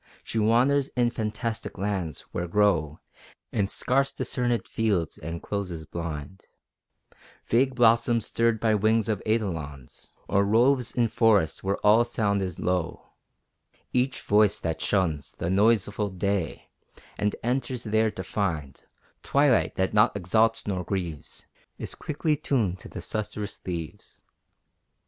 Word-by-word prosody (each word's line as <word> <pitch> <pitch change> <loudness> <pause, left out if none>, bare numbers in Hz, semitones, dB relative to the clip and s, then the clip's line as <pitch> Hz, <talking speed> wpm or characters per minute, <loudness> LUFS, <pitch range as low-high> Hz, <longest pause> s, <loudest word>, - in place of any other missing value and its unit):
She 115 - -3
wanders 130 +6 +3
in 120 -1 +2
fantastic 110 0 -4
lands, 95 -7 -2
where 90 0 -3
grow 85 -6 +2 0.5
In 100 -3 +1
scarce 135 +6 +1
discernèd 120 -2 -1
fields 100 -7 -1
and 85 +2 -6
closes 90 -6 -4
blind, 85 +2 -6 1.0
Vague 130 +3 +2
blossoms 115 -1 +4
stirred 115 -1 +1
by 110 -1 +2
wings 110 +1 +2
of 105 -4 -1
eidolons; 80 - -3 0.2
Or 100 - +3
roves 120 +5 +3
in 120 -2 +1
forests 105 -7 +2
where 100 +1 0
all 110 +3 +6
sound 105 -4 0
is 90 -3 -4
low: 90 -2 -2 0.8
Each 125 +1 0
voice 105 -1 +3
that 80 -1 -3
shuns 85 -8 0
The 85 - -3
noiseful 105 0 +2
day, 95 -2 -2 0.5
and 105 0 0
enters 125 0 -1
there 110 0 +2
to 95 - -6
find 80 -8 -3 0.4
Twilight 140 -3 +2
that 95 0 0
naught 105 -1 +4
exalts 110 +5 +2
nor 95 -3 -2
grieves, 85 -5 -5 0.3
Is - - -6
quickly 155 +1 -1
tuned 115 -11 0
to - - -10
the - - -7
susurrous 105 -1 -4
leaves. 85 -3 -7
105 Hz, 130 wpm, -26 LUFS, 90-115 Hz, 1.0 s, all